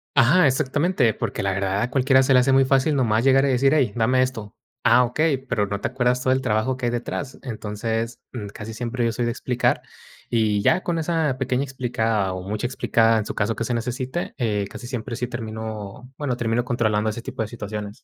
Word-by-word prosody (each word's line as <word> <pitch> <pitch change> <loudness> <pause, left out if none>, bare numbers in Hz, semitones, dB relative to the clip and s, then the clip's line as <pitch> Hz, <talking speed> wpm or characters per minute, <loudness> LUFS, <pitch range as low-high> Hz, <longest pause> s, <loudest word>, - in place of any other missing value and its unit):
Ajá, 150 +9 +5
exactamente, 140 - +2
porque - - -3
la 95 0 0
verdad 95 +1 -1
a 120 - 0
cualquiera 130 0 +4
se 135 +1 +3
le 125 - +7
hace 130 +2 +3
muy 135 0 +5
fácil, 135 +3 +2
nomás 115 -3 +2
llegar, 135 +1 +5
y - - +1
decir: 135 +2 +3
"Hey, 130 -9 +2
dame 125 +3 +3
esto". 115 -6 -3 0.3
Ah, 125 +2 +5
okey, 145 +4 +1
pero, 125 -5 -1
¿no 100 0 -4
te - - 0
acuerdas, 125 0 0
todo 130 0 +2
el 130 - 0
trabajo 120 +2 0
que 125 - -3
hay 120 - +1
detrás? 125 +3 -4
Entonces, 115 -1 -3
mm, 105 -5 -6
casi 110 +1 -7
siempre 120 +1 -2
yo 115 - +1
soy 120 +2 -2
de 120 - 0
explicar, 125 +1 0 0.5
y 110 -3 +1
ya 185 - +3
con 170 -2 -1
esa 160 -4 0
pequeña 130 0 0
explicada, 115 -7 -1
o, 95 +1 -6
mucha 105 +3 -2
explicada 115 -2 +2
en 105 - -1
su - - -4
caso 110 +2 -1
que - - -3
se 120 +1 -2
necesite, 125 +7 -3
eh, 105 -5 -1
casi - - -9
siempre 120 -1 -4
sí 125 - -2
termino, 110 -1 -6
bueno, 130 -4 -1
termino 115 0 0
controlando 110 -3 0
ese 115 +2 -5
tipo 130 -3 -5
de 110 - -1
situaciones. 105 0 -7
120 Hz, 220 wpm, -23 LUFS, 110-130 Hz, 0.5 s, le